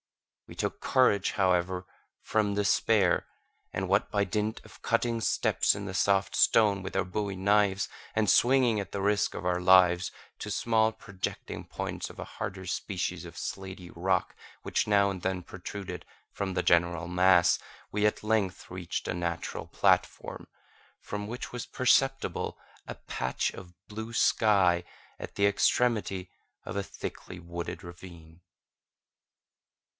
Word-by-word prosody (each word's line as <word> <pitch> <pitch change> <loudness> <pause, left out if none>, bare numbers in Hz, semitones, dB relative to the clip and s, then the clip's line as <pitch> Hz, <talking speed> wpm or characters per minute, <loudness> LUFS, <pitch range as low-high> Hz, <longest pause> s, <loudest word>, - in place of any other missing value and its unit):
We - - -11
took - - -3
courage, 105 -7 +3
however, 90 -1 +1 0.4
from 105 -2 +1
despair, 100 -2 +3 0.5
and 95 0 -2
what, 100 +2 +1
by 100 -1 +2
dint 105 +3 -2
of - - -16
cutting 115 -1 0
steps - - +2
in 100 0 -5
the 95 - -5
soft 95 +1 +2
stone 105 -3 +4
with 95 - -6
our - - +1
bowie 100 +1 -3
knives, 100 0 +2 0.3
and 110 -1 +2
swinging 125 -3 +4
at 100 -1 -5
the 100 - -3
risk 100 +1 +1
of 95 - -6
our 90 0 +1
lives, 90 -1 +5 0.3
to - - -5
small 110 -1 +2
projecting 100 -4 -6
points - - -5
of - - -13
a - - -5
harder 100 -3 -6
species 95 +1 -3
of - - -11
slaty 95 -2 -6
rock 90 +2 0 0.3
which - - 0
now 100 -1 +4
and 95 -2 -5
then 95 0 -1
protruded 95 +2 -7 0.3
from 95 -2 -3
the - - +1
general 85 -1 +2
mass, 90 0 +5 0.3
we 105 0 +1
at 105 - +1
length 105 -4 0
reached 90 -2 -4
a - - -1
natural 85 -1 -3
platform, - - 0 0.5
from 105 0 -5
which 120 +3 -6
was 125 - -5
perceptible 135 +1 +1 0.3
a - - -6
patch 65 0 -2
of 90 -2 -11
blue 110 +2 -6
sky, 95 -7 +3 0.4
at - - -8
the 100 - +3
extremity 100 -2 +1 0.4
of - - -6
a 100 - -1
thickly 90 -1 -8
wooded 85 +2 -6
ravine. 85 -2 -12
95 Hz, 145 wpm, -29 LUFS, 90-105 Hz, 0.5 s, lives